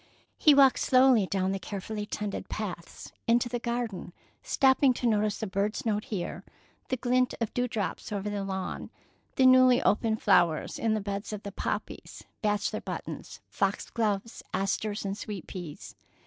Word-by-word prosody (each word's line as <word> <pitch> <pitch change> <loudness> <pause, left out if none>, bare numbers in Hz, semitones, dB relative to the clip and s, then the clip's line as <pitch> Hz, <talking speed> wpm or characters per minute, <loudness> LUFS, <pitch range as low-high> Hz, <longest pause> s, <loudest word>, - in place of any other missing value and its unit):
He 300 -2 +6
walked 275 -2 +6
slowly 255 -6 +5
down 190 0 0
the 195 - -2
carefully 210 +2 -5
tended 210 -1 -4
paths, 185 -6 -6 0.2
into 240 +1 +3
the 240 0 -2
garden, 235 -7 -3 0.3
stopping 270 - +3
to 245 - -4
notice 215 -1 +1
a - - +1
bird's 205 +6 -2
note 210 -1 0
here, 190 -5 -4 0.5
the 260 - 0
glint 250 +1 +1
of 230 -3 -2
dew 245 0 0
drops 215 -3 -4
over 205 0 -3
the 205 -1 -2
lawn, 190 -1 -4 0.5
the 260 - +4
newly 255 -1 +7
opened 220 +1 +2
flowers 165 -3 +2
in 225 -1 +1
the 215 - -1
beds 200 +1 -4
of 210 - -6
poppies, - - -4 0.2
bachelor 210 -1 0
buttons, - - -7
foxglove, 205 +2 -1
asters, 205 +2 -1
and 195 +1 -3
sweet 205 -5 -6
peas. 175 -6 -8
215 Hz, 155 wpm, -28 LUFS, 195-245 Hz, 0.5 s, newly